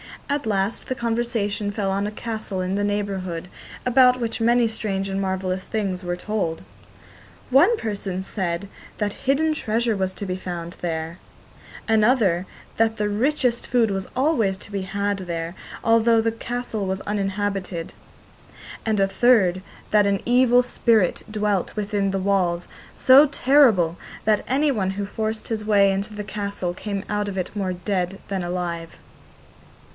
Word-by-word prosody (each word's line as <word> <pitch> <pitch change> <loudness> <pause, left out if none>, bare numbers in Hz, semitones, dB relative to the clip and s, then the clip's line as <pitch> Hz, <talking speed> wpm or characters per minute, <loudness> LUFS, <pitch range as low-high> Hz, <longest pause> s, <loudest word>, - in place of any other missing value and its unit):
At 285 -2 -1
last 200 0 0
the 260 - -2
conversation 225 -3 -1
fell 200 -2 -1
on 200 +1 0
a - - -4
castle 215 -3 -4
in 185 +1 -2
the 205 +1 0
neighbourhood, 190 -4 -3 0.4
about 250 0 +5
which 230 -1 -3
many 235 +1 +4
strange 195 -3 -2
and 195 0 -1
marvellous 190 -1 -2
things 195 -4 -2
were 175 0 -1
told. 180 -3 -3 0.9
One 350 - +5
person 200 - -3
said 190 -1 -3 0.3
that 205 -1 -1
hidden 310 +3 +3
treasure 230 -4 0
was 190 -1 -1
to 200 - -6
be 185 -1 -3
found 175 -2 -6
there; 165 0 -3 0.7
another 215 -5 +3 0.3
that 225 0 +2
the 210 -2 -1
richest 245 +2 +1
food 235 -4 +2
was 195 -1 -3
always 255 -8 +2
to 205 - -11
be 200 -2 -2
had 200 +1 -2
there, 165 0 -3 0.3
although 230 0 +4
the 225 0 +1
castle 230 -3 -4
was 190 +1 -2
uninhabited; 195 -3 -2 0.9
and 220 -2 +1
a 195 - +4
third, 195 -5 +3 0.3
that 210 -1 +5
an 200 -1 +1
evil 245 0 +5
spirit 225 -6 +2
dwelt 210 -3 -1
within 205 -1 0
the 195 0 -1
walls, 185 -3 0 0.3
so 270 +3 +7
terrible, 245 - +4 0.3
that 215 -1 +2
anyone 260 -8 +1
who 200 +1 -3
forced 220 +2 -4
his 220 -2 -2
way 200 -2 +4
into 200 +2 -3
the 210 - -4
castle 200 -3 -3
came 200 +1 -4
out 210 0 -1
of 195 -1 -4
it 185 - -3
more 190 -3 -1
dead 185 0 -2
than 195 -2 -2
alive. 175 -2 -4
205 Hz, 155 wpm, -23 LUFS, 190-225 Hz, 0.9 s, so